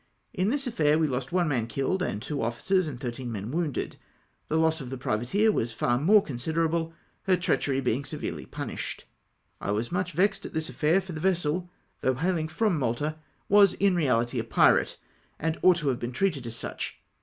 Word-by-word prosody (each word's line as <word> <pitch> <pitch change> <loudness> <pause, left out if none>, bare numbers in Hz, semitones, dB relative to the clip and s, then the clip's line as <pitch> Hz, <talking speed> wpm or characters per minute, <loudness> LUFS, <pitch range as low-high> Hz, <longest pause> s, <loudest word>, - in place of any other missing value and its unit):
In 190 -1 +1
this 275 +2 0
affair 155 - +2
we 160 - +3
lost 130 -2 -2
one 175 -1 +2
man 120 -6 0
Idlled, 135 +11 -1
and 105 - -1
two 145 +1 -3
officers 160 +11 +1
and 130 -5 -6
thirteen 125 0 -5
men 105 +1 -5
womided. 160 -3 -2 0.5
The 160 - 0
loss 160 -1 +2
of 130 - -7
the 130 - -5
privateer 125 - +1
was 115 - -1
far 120 +2 +1
more 200 +8 +5
considerable, 160 +5 -1 0.3
her 185 -2 +4
treachery 140 -6 0
being 130 +2 0
severely - - -5
pmiished. - - -5 0.6
I - - -3
was 110 +3 -1
much 180 -1 -1
vexed 195 +5 +2
at - - -7
this 160 -2 -1
affair, 155 +9 +2
for 190 -1 -9
the 155 - -5
vessel, 175 -1 0 0.3
though 130 - +1
hailing 165 +2 0
fi'om 175 +1 0
Malta, 145 +5 -1 0.3
was 200 -2 +6
in 200 -1 +3
reahty 125 -8 +1
a - - -1
pkate, - - +3 0.4
and 160 +1 -2
ought 180 -2 +6
to 150 -4 0
have 125 -2 -1
been 120 +1 -4
treated 155 -7 0
as 115 - -5
such. - - -5
155 Hz, 195 wpm, -27 LUFS, 125-180 Hz, 0.6 s, was